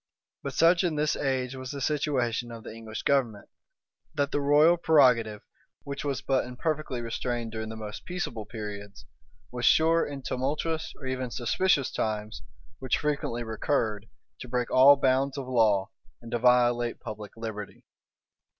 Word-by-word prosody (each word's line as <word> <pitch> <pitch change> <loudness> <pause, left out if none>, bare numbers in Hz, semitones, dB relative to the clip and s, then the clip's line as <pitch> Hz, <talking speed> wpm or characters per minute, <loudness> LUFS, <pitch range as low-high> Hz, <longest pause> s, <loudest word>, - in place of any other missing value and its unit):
But - - -5
such 170 +2 +4
in 170 -4 0
this 150 0 +1
age 130 -2 -1
was 130 -1 -7
the 140 - -5
situation 130 -5 -1
of 115 -1 -9
the - - -8
English 110 -1 -7
government, 120 -7 0 0.7
that 145 -2 0
the 145 - 0
royal 150 +4 +5
prerogative, 125 -10 +3 0.4
which 140 0 -5
was 140 -2 -2
but 135 -1 +1
imperfectly 130 +1 -3
restrained 120 0 -3
during 110 0 -5
the 110 - -6
most 110 -1 -7
peaceable 125 - -4
periods, 105 -1 -8 0.5
was 120 0 -5
sure, 165 +4 +4
in 140 -2 -6
tumultuous 155 +5 -2
or 135 - -11
even 130 -1 -3
suspicious 140 +5 +1
times, 105 - -3 0.4
which - - 0
frequently 140 -5 -2
recurred, 110 -2 -1 0.3
to 125 - -8
break 125 0 -1
all 135 +2 +8
bounds 135 0 +1
of 135 -2 -5
law, 110 -6 +2 0.3
and 115 -1 -11
to 120 - 0
violate 120 -1 +3
public 110 -2 -8
liberty. 110 -2 -7
125 Hz, 155 wpm, -28 LUFS, 115-140 Hz, 0.7 s, all